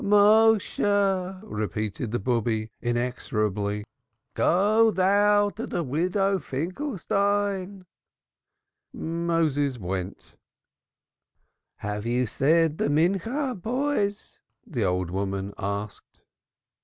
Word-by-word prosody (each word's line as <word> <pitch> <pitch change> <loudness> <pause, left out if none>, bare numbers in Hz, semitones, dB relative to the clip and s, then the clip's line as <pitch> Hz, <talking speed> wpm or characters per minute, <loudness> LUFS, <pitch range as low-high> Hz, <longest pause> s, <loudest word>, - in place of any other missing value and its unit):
"Méshe!" 205 -2 +3
repeated 110 - -3
the 120 - -1
Bube 110 -1 -1
inexorably. 110 -4 -1 0.5
"Go 215 +5 +4
thou 205 +1 +3
to 225 +4 -6
the 170 - -2
Widow 185 +7 0
Finkelstein." 200 - -2 1.1
Moses 160 -5 0
went. 95 -1 -6 1.4
"Have 105 +1 -4
you 125 +1 +1
said 155 +6 +2
the - - +1
afternoon 165 +7 +2
prayer, 260 - -2
boys?" 225 -1 -2 0.3
the 140 - -2
old 90 -2 0
woman 95 +1 -3
asked. 100 +1 -5
165 Hz, 85 wpm, -26 LUFS, -, 1.4 s, Go